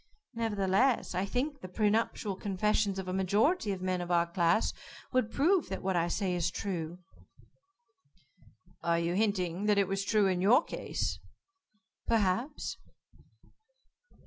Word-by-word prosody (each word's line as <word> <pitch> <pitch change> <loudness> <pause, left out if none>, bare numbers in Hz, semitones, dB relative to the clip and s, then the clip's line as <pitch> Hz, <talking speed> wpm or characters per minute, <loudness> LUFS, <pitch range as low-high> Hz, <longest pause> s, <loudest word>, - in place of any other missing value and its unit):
"Nevertheless, 225 +1 +1
I 185 +2 0
think 275 +7 -2
the 185 - -7
pre 205 +3 +1
nuptial 215 -2 -1
confessions 200 +1 0
of 190 -1 -4
a 185 - -2
majority 205 - +2
of 185 -1 -4
men 185 -1 -1
of 175 - -5
our 170 -1 +3
class, 170 +3 +1 0.4
would 255 -4 +1
prove 335 - +2
that - - -5
what 190 0 0
I 170 0 +2
say 185 +1 -1
is 175 -1 0
true." 175 -3 -4 1.8
"Are 170 0 +1
you 170 +1 0
hinting 195 -2 0
that 210 -1 +3
it 200 -2 +3
was 195 +1 -1
true 210 0 +2
in 185 -2 +1
your 240 - +5
case?" - - -3 0.9
"Perhaps." 230 +6 0
195 Hz, 145 wpm, -31 LUFS, 180-220 Hz, 1.8 s, your